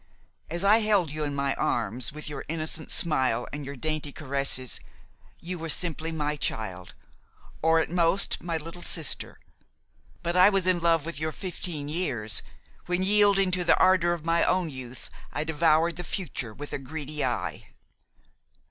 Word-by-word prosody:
As 170 +3 -3
I 210 +3 +6
held 205 -8 +2
you 155 0 -3
in 145 -1 -3
my 140 -1 0
arms, 115 +1 0
with 150 +2 -8
your 150 - -5
innocent 155 0 -3
smile 130 -7 +2
and 145 0 -5
your 140 +1 -6
dainty 155 +1 -3
caresses, 140 -3 0 0.6
you 180 +1 -5
were 165 0 -5
simply 160 0 +1
my 150 -2 -2
child, 95 -9 -3 0.7
or 160 0 +4
at 160 - -1
most 175 +2 +2
my 170 -2 -2
little 165 +3 -8
sister; 160 -4 +1 0.8
but 170 +1 -1
I 185 +2 +7
was 195 -3 +1
in 185 -1 +3
love 165 -2 +2
with 165 -3 -5
your 155 0 -2
fifteen 170 -5 -3
years, 125 - 0 0.5
when, 180 +1 0
yielding 200 -1 +4
to 180 -1 +1
the 170 - +4
ardor 185 -2 +4
of 170 -2 -3
my 165 0 +3
own 180 -3 +1
youth, 130 -2 -8 0.2
I 150 - -2
devoured 160 +1 +2
the 180 - -5
future 155 - -4
with 145 +7 -8
a - - -2
greedy 150 +2 -5
eye. - - -3
160 Hz, 165 wpm, -27 LUFS, 145-175 Hz, 0.8 s, I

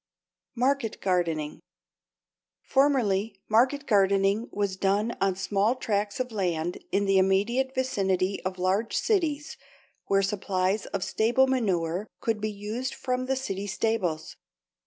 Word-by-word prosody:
=Market 255 -2 0
Gardening.= 165 -5 -1 1.0
Formerly 225 -8 +2
market 255 +6 +3
gardening 200 0 +2
was 200 -2 -1
done 200 +4 0
on 195 -1 +2
small 200 +4 +1
tracts 210 -4 -2
of 250 -1 -2
land 175 -5 -1
in 200 +1 +1
the 195 -1 +4
immediate 225 +8 +1
vicinity 195 -7 0
of 185 0 -3
large 190 +5 0
cities, 320 -8 0 0.5
where 195 0 +3
supplies 195 0 0
of 195 -2 -3
stable 240 +4 +3
manure 195 -7 0
could 225 -2 -1
be 215 - -1
used 215 +5 -4
from 255 0 -2
the 265 - +1
city 200 -7 -4
stables. 190 -6 -1
205 Hz, 125 wpm, -27 LUFS, 190-245 Hz, 1.0 s, the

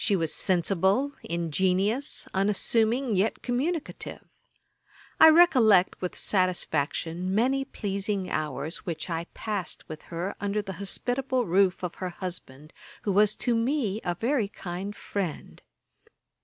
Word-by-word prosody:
She 205 - +3
was 165 -4 0
sensible, 190 - +2
ingenious, 185 - 0
unassuming, 220 +5 +1
yet 195 +4 0
communicative. 290 +7 -3 1.0
I 320 - +10
recollect, 255 - +5
with 180 - -4
satisfaction, 180 -1 0
many 265 +5 +2
pleasing 200 -4 -3
hours 155 0 -3
which 170 0 -5
I 165 0 -2
passed 205 -6 -4
with 155 0 -8
her 175 +3 -3
under 205 +1 -1
the 195 -1 -6
hospitable 250 +5 0
roof 185 0 +2
of 180 - -3
her 185 - -1
husband, 170 -5 -6 0.3
who 205 - 0
was 205 +2 +4
to 245 - +3
me 230 -3 0
a 175 - -1
very 235 - 0
kind 195 +1 -6
friend. 190 -7 -5
195 Hz, 125 wpm, -27 LUFS, 175-230 Hz, 1.0 s, I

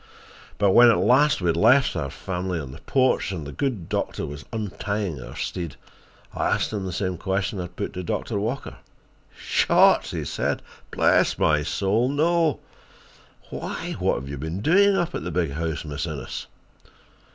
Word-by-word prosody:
But 100 -2 +3
when 120 +4 +8
at 115 - +4
last 135 0 +4
we 90 - 0
had 85 - +2
left 120 +10 +4
the 75 -5 -3
family 90 +2 -3
on 70 -4 -7
the 70 - -12
porch 130 -6 +1
and 85 -6 -5
the 70 - -6
good 120 - -2
doctor - - -2
was 75 +2 -8
untying 100 - -3
our - - -9
steed, 85 -5 -4 0.6
I - - 0
asked - - 0
him 100 -3 -3
the - - -4
same 90 -1 -2
question 95 +1 -1
I 90 - -3
had 90 - -12
put 100 - -4
to 90 - -4
Doctor 100 +4 -2
Walker. 115 +7 -4 0.6
"Shot!" - - +4
he - - -4
said. - - -2 0.3
"Bless - - +3
my 75 -1 +3
soul, 100 - +1
no. 160 +1 +2 0.9
Why, - - -5
what - - +2
have 70 - -5
you 70 -1 -6
been 80 +6 -4
doing 195 - +4
up 175 -1 -1
at - - -4
the - - -3
big 85 -3 -1
house, 80 +1 -3
Miss 75 +2 -4
Innes?" 75 -5 -6
95 Hz, 180 wpm, -24 LUFS, 80-120 Hz, 0.9 s, when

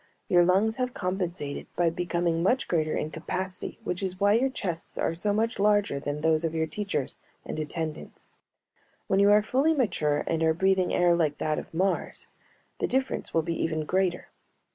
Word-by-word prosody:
Your 175 -1 +5
lungs 200 +6 +2
have 250 -1 -2
compensated 180 -6 -3
by 170 -2 +2
becoming 170 -1 -1
much 245 +9 +2
greater 155 -3 0
in 155 - -3
capacity, 185 +4 -4
which 180 -3 -3
is 185 -1 -3
why 205 0 +4
your 250 +5 +3
chests 175 -10 -5
are - - 0
so 190 +5 0
much 225 +3 0
larger 205 -7 +2
than 145 +1 -4
those 160 0 +2
of 165 0 -1
your 160 0 +1
teachers 195 -5 -3 0.3
and - - -4
attendants; 155 0 -5 0.7
when 195 - +1
you 200 0 +6
are 210 0 +6
fully 280 +8 +2
mature 150 - +1
and 165 -1 -1
are 160 0 +3
breathing 190 +1 +2
air 175 -1 +4
like 155 -4 +1
that 155 -1 -1
of - - -10
Mars, 190 +4 -1 0.5
the - - 0
difference 265 +1 -1
will 165 - +1
be 170 +1 -2
even 155 -1 -1
greater. 185 0 0
175 Hz, 185 wpm, -27 LUFS, 160-205 Hz, 0.7 s, you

